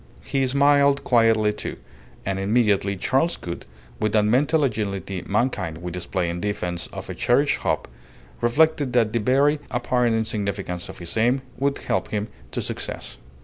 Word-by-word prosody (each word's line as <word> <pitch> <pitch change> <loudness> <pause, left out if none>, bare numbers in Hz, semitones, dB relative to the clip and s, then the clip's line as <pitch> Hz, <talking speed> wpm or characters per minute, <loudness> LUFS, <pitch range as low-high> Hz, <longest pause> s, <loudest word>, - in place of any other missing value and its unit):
He 135 -1 0
smiled 140 +1 +4
quietly, 115 -3 +4
too; 105 - -5 0.5
and 95 0 -1
immediately 100 -1 +2
Charles 135 - +1
Gould, 85 0 -7 0.3
with 110 -1 0
that 105 -1 +4
mental 145 +8 +3
agility 100 -6 -2
mankind 100 -7 0
will 90 +1 -6
display 90 0 -2
in 85 +1 -3
defence 90 -4 -2
of - - -8
a - - -4
cherished - - +2
hope, - - -1 0.5
reflected 145 +2 +3
that 115 -3 +3
the 115 - +2
very 140 +6 +3
apparent 120 -1 +1
insignificance 100 -5 -2
of - - -9
his 85 -1 -5
aim 125 +4 +2 0.2
would 140 +1 +1
help 95 - -1
him 105 0 -3 0.2
to - - -3
success. - - -6
110 Hz, 155 wpm, -24 LUFS, 100-130 Hz, 0.5 s, smiled